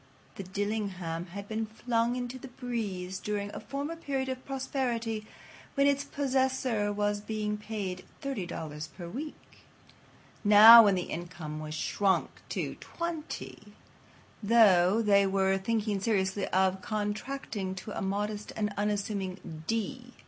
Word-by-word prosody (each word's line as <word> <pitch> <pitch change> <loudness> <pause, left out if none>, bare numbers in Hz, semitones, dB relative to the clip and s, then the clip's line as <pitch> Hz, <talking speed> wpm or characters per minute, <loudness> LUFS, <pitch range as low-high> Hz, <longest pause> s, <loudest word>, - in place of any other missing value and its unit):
The - - -7
"Dillingham" 190 -4 -3
had 200 +3 -8
been 220 +1 -2
flung 240 +2 0
to 255 +2 -8
the 265 - -9
breeze 210 -8 -4
during 205 -1 -3
a - - -5
former 285 +4 -4
period 270 -5 -2
of 260 0 -4
prosperity 240 -5 -2 0.5
when 280 -1 +4
its 280 0 +3
possessor 260 -6 0
was 205 0 0
being 210 0 -2
paid 205 -4 -5 0.2
$30 165 - -4
per 175 -3 -6
week. 290 - -5 1.1
Now, 220 +2 +11
when 200 -2 +4
the 180 - -1
income 165 -3 -6
was 155 0 -5
shrunk 190 +5 +1 0.2
to - - -3
$20, 335 -2 -6 0.7
though, 205 -2 +5
they 200 -2 +5
were 195 0 +2
thinking 210 0 0
seriously 190 -1 0
of 190 0 +2
contracting 210 -1 -3
to 205 +3 -7
a - - -3
modest 205 +2 -2
and 210 -1 -1
unassuming 195 -5 -3
D. 245 +3 -3
210 Hz, 130 wpm, -30 LUFS, 190-240 Hz, 1.1 s, Now